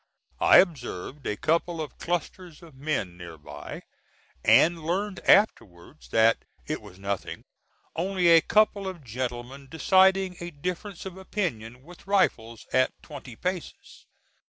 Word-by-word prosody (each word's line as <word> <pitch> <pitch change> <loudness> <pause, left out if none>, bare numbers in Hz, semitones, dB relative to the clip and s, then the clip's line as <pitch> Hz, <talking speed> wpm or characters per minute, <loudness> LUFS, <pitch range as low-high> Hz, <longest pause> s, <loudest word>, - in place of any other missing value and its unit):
I - - +7
observed 140 - 0
a 105 - -2
couple 165 +3 0
of 155 -2 -6
clusters 175 0 -4
of 165 -3 -14
men 130 - -3
near 85 -2 -10
by, 75 - -9 0.6
and 165 -1 +5
learned 190 +4 -2
afterwards 120 - +2
that 115 0 +3 0.2
"it 155 -4 -4
was 100 -4 -14
nothing; 100 -1 -4 0.5
only 185 +1 0
a 165 -1 +8
couple 205 +1 +2
of 180 -5 -7
gentlemen 125 +3 -5
deciding 190 +2 +3
a 175 - -5
difference 180 +5 -6
of 190 -1 -7
opinion 125 - -4
with 175 +5 -15
rifles, 115 - 0
at 130 0 +3
twenty 135 -5 -10
paces." 180 +5 -6
155 Hz, 130 wpm, -26 LUFS, 120-185 Hz, 0.6 s, a